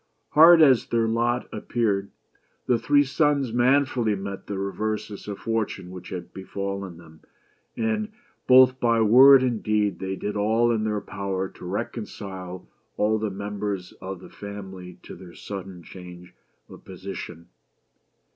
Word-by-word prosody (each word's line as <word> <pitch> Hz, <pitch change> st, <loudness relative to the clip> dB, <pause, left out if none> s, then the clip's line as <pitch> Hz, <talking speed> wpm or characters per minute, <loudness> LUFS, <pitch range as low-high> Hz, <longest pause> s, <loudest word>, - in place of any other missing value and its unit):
Hard 165 Hz, +2 st, +8 dB
as 130 Hz, -5 st, +4 dB
their 115 Hz, -1 st, +1 dB
lot 120 Hz, +2 st, 0 dB
appeared, 100 Hz, -5 st, -1 dB, 0.6 s
the 120 Hz, -2 st, +2 dB
three 145 Hz, +3 st, +3 dB
sons 140 Hz, -3 st, +1 dB
manfully 125 Hz, -3 st, +2 dB
met 100 Hz, 0 st, -7 dB
the 100 Hz, -, -4 dB
reverses 105 Hz, +1 st, -4 dB
of 100 Hz, -1 st, -5 dB
fortune 110 Hz, -5 st, -3 dB
which 90 Hz, -1 st, -10 dB
had 90 Hz, -2 st, -7 dB
befallen 100 Hz, -1 st, -5 dB
them, 80 Hz, -2 st, -16 dB, 0.6 s
and 215 Hz, -1 st, -1 dB, 0.4 s
both 130 Hz, 0 st, +6 dB
by 115 Hz, -2 st, +2 dB
word 130 Hz, +5 st, +8 dB
and 120 Hz, -4 st, -1 dB
deed 105 Hz, -2 st, 0 dB
they 95 Hz, 0 st, -3 dB
did 105 Hz, +2 st, -4 dB
all 110 Hz, +3 st, +2 dB
in 110 Hz, -2 st, 0 dB
their 105 Hz, -1 st, -1 dB
power 95 Hz, -1 st, -4 dB
to -, -, -13 dB
reconcile 95 Hz, -2 st, -6 dB, 0.3 s
all 110 Hz, +1 st, +1 dB
the 110 Hz, 0 st, -2 dB
members 100 Hz, -1 st, -4 dB
of 95 Hz, -1 st, -7 dB
the -, -, -12 dB
family 95 Hz, -3 st, -9 dB
to -, -, -10 dB
their 90 Hz, -2 st, -13 dB
sudden 95 Hz, -3 st, -8 dB
change 90 Hz, -1 st, -12 dB, 0.3 s
of -, -, -14 dB
position. 90 Hz, -3 st, -9 dB
105 Hz, 145 wpm, -25 LUFS, 95-120 Hz, 0.6 s, Hard